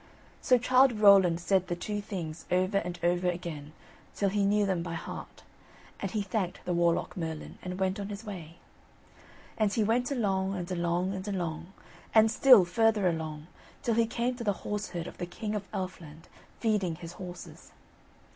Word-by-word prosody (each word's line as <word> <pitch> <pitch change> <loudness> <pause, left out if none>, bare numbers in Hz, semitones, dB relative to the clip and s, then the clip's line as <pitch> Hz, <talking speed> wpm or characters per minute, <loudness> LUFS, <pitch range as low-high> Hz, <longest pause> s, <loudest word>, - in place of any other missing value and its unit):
So 250 - +5
Childe 255 +1 +4
Rowland 195 -5 +6
said 185 +1 +1
the 175 - -2
two 205 +4 -3
things 170 -6 -6
over 185 +2 +2
and 175 -1 -5
over 175 +1 +2
again, 170 -4 -5 0.4
till 200 - +1
he 200 0 +1
knew 205 0 +3
them 190 -3 0
by 170 0 -4
heart, 160 - -8 0.6
and 195 - -3
he 210 +2 -1
thanked 190 -2 -3
the 180 - -1
Warlock 170 +2 +1
Merlin 160 -4 -5
and 180 0 -5
went 190 +1 0
on 200 0 -4
his 205 +2 -7
way. 170 -6 -8 1.0
And 215 -2 +3
he 215 +2 +1
went 240 +4 +1
along, 195 -7 0
and 180 0 -5
along, 175 +1 0
and 190 +1 -5
along, 170 -3 -3 0.4
and 220 0 +6
still 240 -5 +7
further 215 +1 +2
along, 155 -3 -3 0.4
till 235 - +1
he 230 0 +3
came 235 +2 -1
to 240 - -5
the 205 -3 +1
horse 210 0 -2
herd 175 -2 -4
of - - -10
the 175 - -3
King 210 +4 -5
of 205 -2 -4
Elfland 170 -4 -6 0.3
feeding 205 -7 +1
his 170 +1 -9
horses. 180 -1 -9
190 Hz, 180 wpm, -29 LUFS, 175-210 Hz, 1.0 s, still